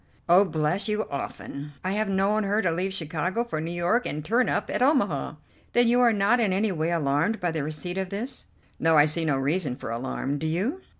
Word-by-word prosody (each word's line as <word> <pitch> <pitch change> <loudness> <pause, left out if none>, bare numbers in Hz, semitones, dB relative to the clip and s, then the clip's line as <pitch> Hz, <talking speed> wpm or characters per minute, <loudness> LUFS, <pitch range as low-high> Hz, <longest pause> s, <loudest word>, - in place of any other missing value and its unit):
"Oh, 180 +4 +6
bless 165 +3 -1
you, 210 0 -1
often. 140 +1 -6
I 185 - -1
have 210 +1 -1
known 195 +2 +2
her 205 +2 +1
to 175 - +2
leave 185 +4 -1
Chicago 180 +4 -2
for 225 -10 -4
New 165 - -4
York 175 +8 0
and 150 +1 -5
turn 235 +7 +2
up - - -1
at - - -2
Omaha." 205 - +1 0.4
"Then 240 0 +4
you 245 +1 +4
are 240 -1 +5
not 210 +3 +2
in 215 -5 +2
any 200 +3 +1
way 160 -2 -1
alarmed 165 +6 0
by 175 -1 -1
the 160 -3 -2
receipt 155 +5 -3
of 190 -1 -3
this?" 215 +7 -5 0.3
"No, 160 -1 +4
I 145 - +7
see 160 +2 +3
no 145 -4 +1
reason 140 0 0
for 115 - -7
alarm; 130 +4 -3
do 160 - -2
you?" 210 - -1
180 Hz, 225 wpm, -26 LUFS, 155-210 Hz, 0.4 s, I